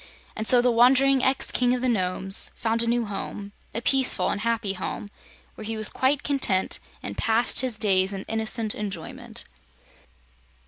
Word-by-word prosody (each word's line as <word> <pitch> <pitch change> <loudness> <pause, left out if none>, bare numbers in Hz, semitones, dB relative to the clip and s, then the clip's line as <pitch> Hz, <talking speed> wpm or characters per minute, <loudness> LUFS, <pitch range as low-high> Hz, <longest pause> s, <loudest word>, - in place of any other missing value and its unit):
And 220 - -3
so 245 -1 +6
the 250 - +3
wandering 260 +3 +4
ex 265 +1 +1
King 250 0 +1
of 250 - -4
the - - +1
Nomes 190 -3 0
found 230 0 0
a 235 - 0
new 235 0 0
home, 205 0 -7 0.2
a 230 - -5
peaceful 265 -1 +2
and 205 - -4
happy 230 -3 -1
home, 195 +2 -6 0.4
where - - -10
he 220 +1 -4
was 215 -1 +3
quite 270 +2 0
content 265 -10 +1 0.2
and - - -6
passed 230 +1 +2
his 255 -5 -1
days 195 -3 +2
in 195 -1 -5
innocent 220 0 0
enjoyment. 195 -6 -7
225 Hz, 170 wpm, -24 LUFS, 205-250 Hz, 0.4 s, so